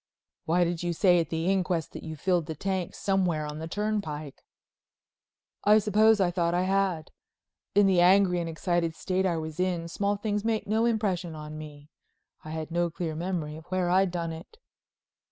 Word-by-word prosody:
"Why 175 +2 +3
did 170 -1 -1
you 175 -1 -1
say 175 +1 +4
at 165 - -1
the 165 0 -2
inquest 180 -3 0
that - - -8
you 160 -1 -6
filled 175 +1 0
the 160 - -4
tank 190 +1 -3
somewhere 180 -6 0
on 150 +1 -6
the 160 - -5
turnpike?" 165 -8 -3 1.2
"I 210 +1 +6
suppose 215 +1 +4
I 180 -2 +2
thought 170 -1 0
I 180 - +2
had. 190 -4 0 0.6
In 205 0 +6
the 185 -2 +4
angry 185 0 +5
and 170 -1 -3
excited 165 0 -1
state 190 +2 0
I 170 -2 0
was 160 0 -6
in 180 -2 0
small 200 +4 -1
things 205 0 -2
made 225 -1 0
no 220 +2 +1
impression 190 -7 -1
on 150 0 -8
me. 150 -1 -10 0.5
I 155 - -9
had 160 0 -5
no 175 0 +1
clear 165 -1 -4
memory 165 -2 -3
of 160 - -12
where 180 -1 0
I'd 190 +1 +4
done 170 -1 -3
it." 165 - -10
175 Hz, 190 wpm, -28 LUFS, 160-195 Hz, 1.2 s, I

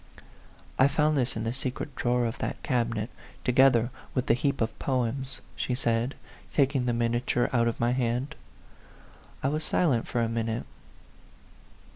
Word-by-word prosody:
I 130 - +7
found 150 +1 +2
this 130 -3 +1
in 110 - -2
the 115 +1 -1
secret 130 +2 -4
drawer 120 0 +1
of 115 - -3
that - - -3
cabinet, 115 -3 0 0.3
together 125 -1 +4 0.2
with 130 -1 +1
the - - +4
heap 135 +3 0
of 115 - -1
poems," 130 0 -1
she 125 - -1
said, 120 +1 0 0.4
taking 135 -3 +2
the - - +3
miniature 120 +1 +1
out 120 -1 +3
of 115 - -2
my 120 +1 +2
hand. 125 +3 0 1.1
I 135 - +3
was 155 +2 -1
silent 140 -8 +1
for 120 - -1
a 115 - +2
minute. 115 0 -2
125 Hz, 155 wpm, -28 LUFS, 115-135 Hz, 1.1 s, I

